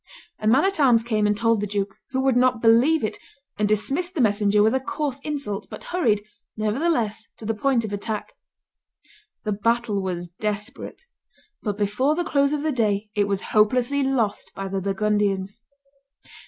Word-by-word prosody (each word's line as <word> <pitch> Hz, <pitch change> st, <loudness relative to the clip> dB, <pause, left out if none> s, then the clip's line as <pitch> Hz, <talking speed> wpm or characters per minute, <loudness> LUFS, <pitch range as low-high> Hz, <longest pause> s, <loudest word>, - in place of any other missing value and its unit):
A 215 Hz, -, -2 dB
man 260 Hz, +9 st, +5 dB
at 390 Hz, -4 st, 0 dB
arms 245 Hz, -5 st, +5 dB
came 215 Hz, -3 st, +1 dB
and 210 Hz, 0 st, +1 dB
told 230 Hz, 0 st, +2 dB
the 210 Hz, -, -1 dB
duke, 200 Hz, -1 st, -2 dB
who 260 Hz, 0 st, -1 dB
would 265 Hz, -2 st, +3 dB
not 250 Hz, -1 st, +3 dB
believe 235 Hz, +8 st, +4 dB
it, 215 Hz, -, -2 dB, 0.4 s
and 210 Hz, -1 st, +2 dB
dismissed 280 Hz, -, -1 dB
the -, -, -2 dB
messenger 205 Hz, -1 st, +3 dB
with 220 Hz, -, +3 dB
a 265 Hz, -, +2 dB
coarse 285 Hz, 0 st, -3 dB
insult, 275 Hz, -9 st, -4 dB
but -, -, -9 dB
hurried, 225 Hz, -, +2 dB, 0.3 s
nevertheless, 225 Hz, -1 st, 0 dB
to 220 Hz, -, -10 dB
the 225 Hz, -, 0 dB
point 235 Hz, +1 st, +1 dB
of 205 Hz, -, -6 dB
attack. 210 Hz, +1 st, -4 dB, 1.1 s
The 215 Hz, -, -1 dB
battle 220 Hz, 0 st, 0 dB
was 175 Hz, -2 st, -4 dB
desperate; 210 Hz, -, -5 dB, 0.6 s
but 205 Hz, -3 st, -3 dB
before 215 Hz, +9 st, +1 dB
the 350 Hz, -, 0 dB
close 280 Hz, -2 st, +2 dB
of 300 Hz, -1 st, -1 dB
the 310 Hz, -, +1 dB
day 210 Hz, -4 st, 0 dB
it 205 Hz, -2 st, +1 dB
was 200 Hz, -1 st, -3 dB
hopelessly 245 Hz, +6 st, +3 dB
lost 260 Hz, -6 st, 0 dB
by 195 Hz, 0 st, -4 dB
the 195 Hz, 0 st, -2 dB
Burgundians. 200 Hz, +1 st, 0 dB
220 Hz, 175 wpm, -24 LUFS, 205-265 Hz, 1.1 s, man